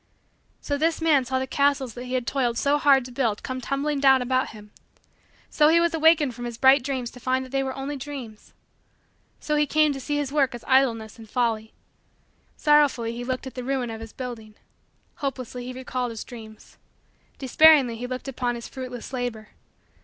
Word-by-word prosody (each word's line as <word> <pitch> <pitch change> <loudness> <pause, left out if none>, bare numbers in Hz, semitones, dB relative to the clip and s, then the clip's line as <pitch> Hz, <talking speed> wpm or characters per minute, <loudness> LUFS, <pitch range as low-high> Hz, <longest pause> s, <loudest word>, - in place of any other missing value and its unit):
So 285 -1 -2
this 325 +1 +1
man 305 -5 +3
saw 260 +1 -1
the 260 - -1
castles 275 -2 +1
that 245 +3 -8
he 255 +1 -3
had 250 -2 -1
toiled 245 -3 0
so 285 +3 +2
hard 275 -3 +4
to 255 - -9
build 235 -5 -1
come 255 0 -4
tumbling 280 +3 -1
down 270 -1 +5
about 255 +1 0
him. 210 -1 -13 0.8
So 300 - +4
he 330 +2 +5
was 340 0 +1
awakened 315 -4 +4
from 240 +1 -7
his 235 -1 -6
bright 265 +2 +6
dreams 255 -2 -3
to 250 - -13
find 260 +1 -1
that 255 - -14
they 270 0 0
were 265 -1 -3
only 275 +2 -4
dreams. 255 -6 -9 0.9
So 300 - -1
he 295 0 +2
came 305 0 +3
to 270 - -6
see 290 +2 -2
his 285 -2 -2
work 275 -4 +1
as 240 - -10
idleness 235 -5 +2
and 220 -1 -12
folly. 225 -2 -1 0.9
Sorrowfully 290 -6 +3
he 240 - -5
looked 255 +1 -3
at 265 - -7
the 250 - -6
ruin 255 -2 -2
of 225 0 -7
his 225 -1 -9
building. 230 -4 -8 0.6
Hopelessly 255 -4 -5
he 255 - -5
recalled 255 -1 -4
his 225 -2 -6
dreams. 220 -3 -13 0.6
Despairingly 275 -2 +5
he 245 +2 -5
looked 255 +2 -6
upon 245 -2 -2
his 235 - -7
fruitless 255 -1 -8
labor. 245 -4 -4
260 Hz, 200 wpm, -25 LUFS, 240-280 Hz, 0.9 s, bright